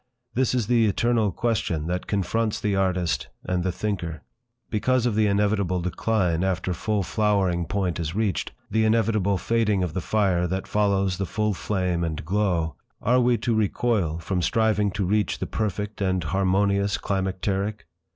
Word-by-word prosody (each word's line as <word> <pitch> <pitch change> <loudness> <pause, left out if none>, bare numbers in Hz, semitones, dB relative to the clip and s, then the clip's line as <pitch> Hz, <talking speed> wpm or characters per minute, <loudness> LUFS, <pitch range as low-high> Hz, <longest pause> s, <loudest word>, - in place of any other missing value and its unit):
This 130 0 +1
is 120 -4 +1
the 115 0 +3
eternal 115 0 +2
question 90 -8 -1
that 90 +2 -3
confronts 110 +2 0
the 105 -2 0
artist 90 -7 0 0.2
and 90 -1 -1
the 95 - 0
thinker. 90 -4 -3 0.5
Because 125 +3 +1
of 120 - +1
the 110 0 +3
inevitable 100 -2 +1
decline 90 -1 0
after 95 -1 0
full 105 +2 -1
flowering 95 -4 +1
point 95 -3 -1
is 80 +1 -3
reached, 105 -3 -1 0.2
the 110 0 +2
inevitable 110 -3 +2
fading 105 0 +1
of 85 -4 -3
the 95 - -2
fire 95 -3 +1
that 95 +2 -3
follows 100 -3 +1
the 95 - -1
full 105 +2 0
flame 90 -3 -1
and 80 -3 -3
glow, 90 -4 0 0.3
are 125 +4 +3
we 120 0 +3
to 120 - -1
recoil 105 -5 +1
from 90 +2 -2
striving 105 +1 +2
to 95 0 -2
reach 105 +2 +1
the - - -3
perfect 105 -1 -3
and 95 -2 +1
harmonious 100 +4 +1
climacteric? 95 +2 -2
100 Hz, 160 wpm, -25 LUFS, 90-110 Hz, 0.5 s, the